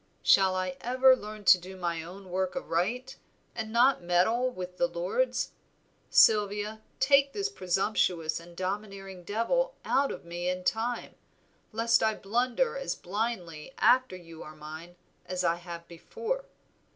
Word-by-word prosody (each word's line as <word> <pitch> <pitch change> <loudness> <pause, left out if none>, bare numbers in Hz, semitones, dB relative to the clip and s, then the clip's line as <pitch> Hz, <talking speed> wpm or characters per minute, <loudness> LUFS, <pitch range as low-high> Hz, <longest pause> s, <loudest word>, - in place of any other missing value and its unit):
Shall 190 -1 +5
I 185 -1 -2
ever 255 +2 +5
learn 215 -3 -9
to 180 0 +8
do 185 +2 -10
my 170 -2 -2
own 185 +3 -11
work 185 0 -1
aright, 240 +2 -2 0.4
and 220 0 -5
not 245 +2 +4
meddle 185 +9 +2
with 180 -6 -7
the 175 - +2
Lord's? 175 - -1 0.6
Sylvia, 210 0 +4 0.2
take 275 +1 +4
this 405 0 -1
presumptuous 185 - 0
and 170 0 -14
domineering 195 -1 -5
devil - - 0
out 275 0 +2
of - - -8
me 175 +1 -3
in 180 0 -3
time, 230 +5 -1 0.6
lest 230 +1 +2
I 220 -1 +2
blunder 250 - 0
as - - -3
blindly 185 -3 -4
after 255 -6 +4
you 165 -2 -12
are 155 - -10
mine 155 +3 -10 0.3
as 185 0 -2
I 170 0 +2
have 170 -1 -9
before. 465 - -4
195 Hz, 145 wpm, -29 LUFS, 175-240 Hz, 0.6 s, to